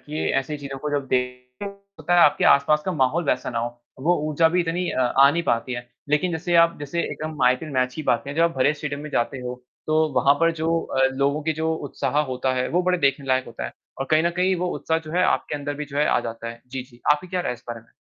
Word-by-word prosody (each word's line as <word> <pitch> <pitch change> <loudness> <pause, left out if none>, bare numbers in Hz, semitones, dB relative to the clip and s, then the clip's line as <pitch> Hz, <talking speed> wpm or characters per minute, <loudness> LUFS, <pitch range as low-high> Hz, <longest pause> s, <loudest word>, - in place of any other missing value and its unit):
कि 150 +1 -3
ऐसी 150 +3 -5
चीज़ों 135 -1 -7
को 150 +2 -4
जब 140 -2 -1
देखते 125 +4 -3
हैं, 200 - -4 0.3
होता 175 - 0
है 175 - +6
आपके 150 - +5
आस-पास 150 +2 +4
का 185 - 0
माहौल 155 +3 +1
वैसा 130 -2 0
ना - - -2
हो। 120 +1 -4 0.2
वो 175 +3 +3
ऊर्जा 160 +2 +3
भी 180 +2 +1
इतनी 175 +1 -1
अ, - - -1
आ 135 +2 +5
नहीं 170 +3 -1
पाती 120 -2 0
है। 120 0 -6 0.2
लेकिन 150 +4 +1
जैसे 175 +2 -2
आप 170 - +1
जैसे 145 +4 -2
एकदम 155 -3 -5
आईपीएल 130 +5 +2
मैच 130 -1 0
की 155 - -5
बात 120 -4 +1
करें। 140 +1 -6
जब 165 - +4
आप 170 - +4
भरे 130 +3 +3
स्टेडियम 145 -1 -5
में 150 - -7
जाते 130 +2 -1
हो 125 0 -6 0.2
तो 155 0 +1 0.2
वहाँ 140 +1 +4
पर 165 0 +4
जो 165 +1 0
अ, 135 0 +2
लोगों 140 +2 0
के 160 +1 0
जो 160 +1 -1 0.2
उत्साह 140 +3 -1
होता 130 -2 -1
है 125 0 -1
वो 180 +2 +1
बड़े 180 0 +1
देखने 140 -1 +1
लायक 130 0 +2
होता - - -7
है, - - -5 0.3
और 135 - -2
कहीं 155 +1 +4
न 170 - +2
कहीं 185 +1 +2
वो 180 +1 -1
उत्साह 160 0 0
जो 155 -1 -10
है 180 - +2
आपके 150 - 0
अंदर 145 0 -3
भी 150 +1 -5
जो 140 0 -9
है 150 - +3
आ - - +3
जाता 115 0 -6
है। 115 0 -9
जी, 130 0 -5
जी, 125 -2 -19
आपकी 150 +5 -3
क्या 180 0 -1
राय 175 - -2
है 125 - -2
इस 120 - -18
बारे 115 -1 -5
में? 115 - -25
145 Hz, 280 wpm, -23 LUFS, 130-165 Hz, 0.3 s, है